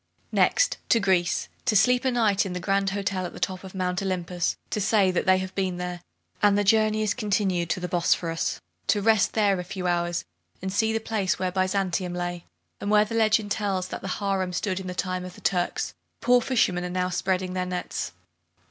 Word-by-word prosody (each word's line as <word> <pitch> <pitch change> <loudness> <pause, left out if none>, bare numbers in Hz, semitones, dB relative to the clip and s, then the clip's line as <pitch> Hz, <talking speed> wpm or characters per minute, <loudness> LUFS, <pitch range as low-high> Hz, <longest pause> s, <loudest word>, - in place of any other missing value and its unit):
Next - - +3
to 230 - +5
Greece, 185 -4 +1 0.2
to 240 -4 +2
sleep 245 +5 +4
a - - +4
night 220 -5 +2
in 190 - -4
the 180 - -3
grand 195 +2 +1
hotel 190 -1 -2
at - - -11
the - - -9
top 185 -1 -2
of 190 0 -10
Mount 180 0 -1
Olympus, 180 -2 -1
to 210 - -1
say 200 -2 +3
that 180 - -1
they 185 0 +6
have 185 0 -4
been 185 -2 -1
there; 180 -1 -4 0.4
and 205 -1 +5
the 205 - +2
journey 215 +1 +3
is 210 0 +1
continued 195 -6 0
to - - 0
the 180 - -3
Bosphorus, 170 -1 0 0.3
to 210 - +3
rest 220 -1 +3
there 200 -4 +2
a - - -3
few 185 +1 -6
hours, 175 - 0 0.3
and 190 0 -4
see 220 +2 +2
the 225 - 0
place 215 -4 -1
where 185 -1 -1
Byzantium 185 -1 0
lay; 175 -1 -4 0.3
and 200 - -3
where 210 0 +5
the 220 - -7
legend 220 -2 +2
tells 195 -3 -1
that - - -5
the - - -5
harem 195 -3 -1
stood 185 +1 -1
in 190 - -7
the 180 - -5
time 185 -1 -2
of 180 0 -8
the - - -14
Turks, 180 -2 0 0.3
poor 245 0 +4
fishermen 205 -8 +1
are 180 - -3
now 180 0 -1
spreading 185 0 -1
their 185 0 -2
nets. 180 0 -3
190 Hz, 215 wpm, -26 LUFS, 180-205 Hz, 0.4 s, they